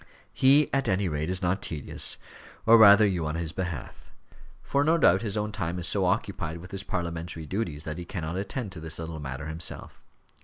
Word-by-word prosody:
He, 140 Hz, +3 st, +5 dB
at 135 Hz, 0 st, +1 dB
any 95 Hz, +1 st, +1 dB
rate, 75 Hz, 0 st, -2 dB
is 90 Hz, 0 st, -2 dB
not 90 Hz, +3 st, 0 dB
tedious 75 Hz, -4 st, -1 dB, 0.5 s
or 115 Hz, -, +8 dB
rather 105 Hz, -1 st, +8 dB
you 90 Hz, -6 st, 0 dB
on 75 Hz, -, -3 dB
his 85 Hz, -1 st, -2 dB
behalf; 90 Hz, -1 st, -6 dB, 0.5 s
for 140 Hz, 0 st, +1 dB
no 160 Hz, +3 st, +3 dB
doubt 95 Hz, -, +4 dB
his 105 Hz, -2 st, -3 dB
own 105 Hz, 0 st, -1 dB
time 90 Hz, -5 st, -3 dB
is 90 Hz, 0 st, +1 dB
so 100 Hz, -2 st, +1 dB
occupied 90 Hz, -4 st, -1 dB
with 90 Hz, +2 st, -11 dB
his 95 Hz, -1 st, -4 dB
parliamentary 85 Hz, -3 st, -4 dB
duties 80 Hz, -4 st, -3 dB
that 75 Hz, +2 st, -5 dB
he 85 Hz, -, -6 dB
cannot 85 Hz, -2 st, -4 dB
attend 100 Hz, +3 st, -4 dB
to 90 Hz, -, -8 dB
this 80 Hz, 0 st, -5 dB
little 80 Hz, -1 st, -6 dB
matter 70 Hz, +1 st, -6 dB
himself. 80 Hz, +1 st, -6 dB
90 Hz, 200 wpm, -27 LUFS, 80-100 Hz, 0.5 s, or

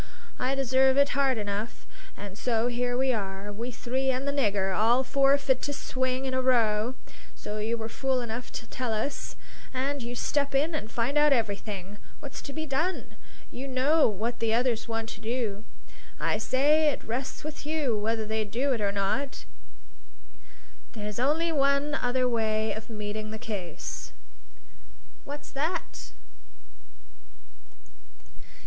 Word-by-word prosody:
I 260 Hz, +2 st, +1 dB
deserve 265 Hz, 0 st, +4 dB
it 280 Hz, 0 st, +6 dB
hard 270 Hz, -2 st, +2 dB
enough. 210 Hz, +2 st, -3 dB, 0.3 s
And 200 Hz, -1 st, -7 dB
so 230 Hz, 0 st, +1 dB
here 245 Hz, 0 st, 0 dB
we 260 Hz, 0 st, +3 dB
are, 200 Hz, -1 st, -3 dB
we 230 Hz, +4 st, -4 dB
three 255 Hz, +2 st, -1 dB
and 260 Hz, +2 st, 0 dB
the -, -, +3 dB
nigger, 200 Hz, -8 st, +1 dB
all 235 Hz, +4 st, +4 dB
four 275 Hz, +1 st, +4 dB
fit 265 Hz, -2 st, +1 dB
to 290 Hz, -, -2 dB
swing 260 Hz, -1 st, -1 dB
in 260 Hz, -, -1 dB
a 260 Hz, -, +2 dB
row, 235 Hz, -2 st, +3 dB, 0.4 s
as -, -, -17 dB
you 215 Hz, +2 st, -1 dB
were 220 Hz, -1 st, -4 dB
fool 265 Hz, +2 st, 0 dB
enough 240 Hz, 0 st, -4 dB
to -, -, -5 dB
tell 250 Hz, -4 st, -2 dB
us; 220 Hz, +7 st, -2 dB, 0.4 s
and 275 Hz, +2 st, -1 dB
you 240 Hz, +1 st, -4 dB
step 280 Hz, +2 st, 0 dB
in 305 Hz, +5 st, +3 dB
and 285 Hz, -8 st, -3 dB
find 245 Hz, +6 st, +1 dB
out 295 Hz, -1 st, +6 dB
everything. 205 Hz, -4 st, -2 dB, 0.2 s
What's 280 Hz, -, -7 dB
to 280 Hz, -, -7 dB
be 315 Hz, +2 st, -3 dB
done? 315 Hz, +6 st, -1 dB, 0.4 s
You 265 Hz, +3 st, -5 dB
know 275 Hz, +4 st, +4 dB
what 220 Hz, +4 st, -2 dB
the 225 Hz, -1 st, +2 dB
others 240 Hz, -2 st, +1 dB
want 225 Hz, -1 st, -2 dB
to 200 Hz, -, -8 dB
do. 225 Hz, -3 st, -2 dB, 0.5 s
I -, -, +1 dB
say 300 Hz, +4 st, +4 dB
it -, -, -3 dB
rests 250 Hz, +4 st, -4 dB
with 305 Hz, 0 st, -6 dB
you 295 Hz, -6 st, 0 dB
whether 220 Hz, +1 st, 0 dB
they 220 Hz, 0 st, 0 dB
do 245 Hz, +7 st, 0 dB
it 230 Hz, -, -2 dB
or 200 Hz, -1 st, +2 dB
not. 200 Hz, +8 st, -1 dB, 1.5 s
There's 210 Hz, -1 st, -5 dB
only 310 Hz, +6 st, +2 dB
one 280 Hz, 0 st, +2 dB
other 255 Hz, -3 st, +2 dB
way 220 Hz, -2 st, +1 dB
of 220 Hz, +1 st, -7 dB
meeting 215 Hz, 0 st, -4 dB
the 220 Hz, -, -5 dB
case." 195 Hz, -7 st, -5 dB, 1.1 s
"What's 290 Hz, +1 st, -7 dB
that?" 315 Hz, +5 st, -3 dB
245 Hz, 155 wpm, -28 LUFS, 220-275 Hz, 1.5 s, it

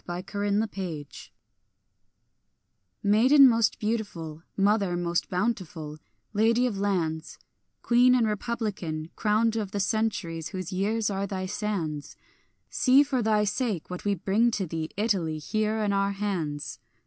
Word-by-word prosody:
THE 175 Hz, -, -3 dB, 0.2 s
SONG 205 Hz, 0 st, -1 dB
OF 205 Hz, 0 st, +2 dB
THE 225 Hz, -, -1 dB
STANDARD 165 Hz, -7 st, -5 dB, 1.9 s
MAIDEN 255 Hz, +7 st, +7 dB
most 230 Hz, -3 st, +2 dB
beautiful, 200 Hz, -8 st, -3 dB, 0.2 s
mother 200 Hz, -3 st, +2 dB
most 175 Hz, 0 st, -1 dB
bountiful, 180 Hz, -6 st, -3 dB, 0.3 s
lady 225 Hz, +4 st, +3 dB
of 215 Hz, -6 st, -2 dB
lands, 165 Hz, -6 st, -1 dB, 0.5 s
Queen 250 Hz, +1 st, +5 dB
and 240 Hz, -2 st, +3 dB
republican, 205 Hz, -8 st, -3 dB
crowned 220 Hz, +1 st, +2 dB
of 210 Hz, -3 st, -2 dB
the 205 Hz, 0 st, -3 dB
centuries 200 Hz, -6 st, -1 dB
whose 185 Hz, -1 st, -5 dB
years 210 Hz, +3 st, 0 dB
are 195 Hz, 0 st, -2 dB
thy 185 Hz, -1 st, -3 dB
sands, 185 Hz, -7 st, -3 dB, 0.5 s
See 265 Hz, +2 st, +4 dB
for 270 Hz, -3 st, -1 dB
thy 215 Hz, -1 st, +2 dB
sake 210 Hz, -, -2 dB
what 180 Hz, -, -6 dB
we 205 Hz, -1 st, +1 dB
bring 200 Hz, +6 st, +2 dB
to 210 Hz, -4 st, -2 dB
thee, 160 Hz, -1 st, -4 dB
Italy, 190 Hz, -8 st, 0 dB
here 215 Hz, +7 st, -1 dB
in 205 Hz, -1 st, +1 dB
our 200 Hz, 0 st, +1 dB
hands. 175 Hz, -8 st, -3 dB
200 Hz, 140 wpm, -27 LUFS, 175-220 Hz, 1.9 s, MAIDEN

